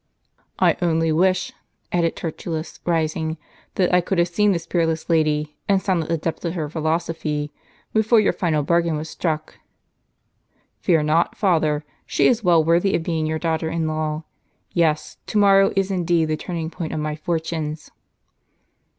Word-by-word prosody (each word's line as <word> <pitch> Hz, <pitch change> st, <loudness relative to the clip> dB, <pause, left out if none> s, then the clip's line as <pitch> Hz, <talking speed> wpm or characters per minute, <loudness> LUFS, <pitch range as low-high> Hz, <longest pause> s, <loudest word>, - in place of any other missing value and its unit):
"I -, -, +3 dB
only 165 Hz, -2 st, +2 dB
wdsh," 185 Hz, +3 st, +2 dB, 0.4 s
added 170 Hz, -2 st, +1 dB
Tertullus, 160 Hz, 0 st, -5 dB
rising, 160 Hz, -1 st, 0 dB, 0.4 s
"that 180 Hz, -2 st, +1 dB
I 180 Hz, -, +5 dB
could 185 Hz, +2 st, -2 dB
have 170 Hz, 0 st, +3 dB
seen 210 Hz, +4 st, +3 dB
this 170 Hz, -3 st, -2 dB
peerless 165 Hz, -1 st, -1 dB
lady, 150 Hz, -2 st, +1 dB
and 195 Hz, -1 st, +4 dB
sounded 185 Hz, -5 st, -1 dB
the 165 Hz, -, +1 dB
depths 160 Hz, +1 st, -4 dB
of 170 Hz, 0 st, -2 dB
her 155 Hz, -4 st, -2 dB
phil 160 Hz, +1 st, -5 dB
osophy, 155 Hz, -2 st, -1 dB, 0.4 s
before 220 Hz, +1 st, +4 dB
your 210 Hz, -, +3 dB
final 155 Hz, -5 st, 0 dB
bargain 170 Hz, 0 st, +1 dB
was 155 Hz, +1 st, -6 dB
struck." 155 Hz, -3 st, -3 dB, 1.2 s
"Fear 165 Hz, -5 st, +2 dB
not, 155 Hz, +3 st, +1 dB
father: 155 Hz, -6 st, +1 dB, 0.2 s
she -, -, +1 dB
is 235 Hz, -2 st, +3 dB
well 170 Hz, -3 st, +5 dB
worthy 170 Hz, +4 st, +3 dB
of 160 Hz, -, -1 dB
being 160 Hz, -2 st, -1 dB
your 160 Hz, 0 st, -1 dB
daughter 160 Hz, 0 st, -1 dB
in 165 Hz, -1 st, -1 dB
law. 155 Hz, 0 st, -2 dB, 0.5 s
Yes, 160 Hz, -3 st, 0 dB
to -, -, -1 dB
morrow 195 Hz, -1 st, +5 dB
is 195 Hz, 0 st, +1 dB
indeed 175 Hz, -3 st, +2 dB
the 155 Hz, -, +1 dB
turning 165 Hz, 0 st, -4 dB
point 170 Hz, -3 st, -5 dB
of 155 Hz, -, -2 dB
my 150 Hz, 0 st, -2 dB
fortunes." 160 Hz, -1 st, -3 dB
165 Hz, 165 wpm, -22 LUFS, 155-175 Hz, 1.2 s, I